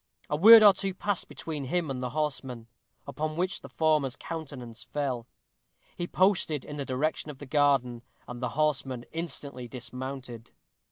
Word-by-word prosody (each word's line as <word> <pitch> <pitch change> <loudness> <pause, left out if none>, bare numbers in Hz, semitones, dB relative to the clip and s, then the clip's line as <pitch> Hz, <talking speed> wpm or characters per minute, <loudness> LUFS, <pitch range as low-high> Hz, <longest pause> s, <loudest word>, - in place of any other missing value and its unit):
A - - +2
word 220 +7 +10
or 205 -2 +9
two 190 -1 -3
passed 205 -1 -1
between 150 -4 -6
him 165 +1 -1
and 130 -1 -4
the 125 - -2
horsemen, 135 -4 -3 0.4
upon 155 +2 -3
which 180 +2 -1
the - - -11
former's 155 -5 +1
countenance 140 -9 -7
fell. 130 -5 -3 0.7
He 175 - -3
posted 175 -7 +2
in 145 - -7
the 140 - -3
direction 150 +4 -1
of 145 - -8
the 145 - -9
garden; 135 -4 +2 0.3
and 120 0 -7
the 125 - -1
horsemen 135 -5 0
instantly 140 -6 -4
dismounted. 125 -1 -7
145 Hz, 160 wpm, -28 LUFS, 125-160 Hz, 0.7 s, word